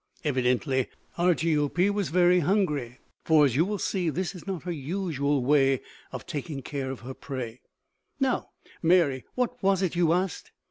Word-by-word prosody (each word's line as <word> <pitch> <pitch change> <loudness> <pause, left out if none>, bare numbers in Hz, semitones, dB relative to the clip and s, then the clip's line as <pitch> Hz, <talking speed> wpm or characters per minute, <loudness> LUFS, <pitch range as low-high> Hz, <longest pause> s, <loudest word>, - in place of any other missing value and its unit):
Evidently 130 -1 +1 0.3
Argiope 170 +1 +2
was 205 -2 -1
very 180 +1 +4
hungry, 150 - 0 0.3
for 155 -2 +5
as 130 - +1
you 155 - +4
will 205 +3 -2
see, 185 -3 -1
this 185 +4 -2
is 180 0 -11
not 190 -5 -4
her 180 - -3
usual 145 -3 -1
way 135 -2 +4 0.3
of - - -7
taking 145 -4 -5
care 140 -3 -4
of 130 - -6
her 130 +3 -7
prey. 125 -4 -6 0.6
"Now, - - 0 0.3
Mary, 165 -7 +3
what 250 0 -1
was 195 0 +2
it 180 -2 -1
you 170 -2 +3
asked?" 180 +1 -1
160 Hz, 165 wpm, -27 LUFS, 135-180 Hz, 0.6 s, for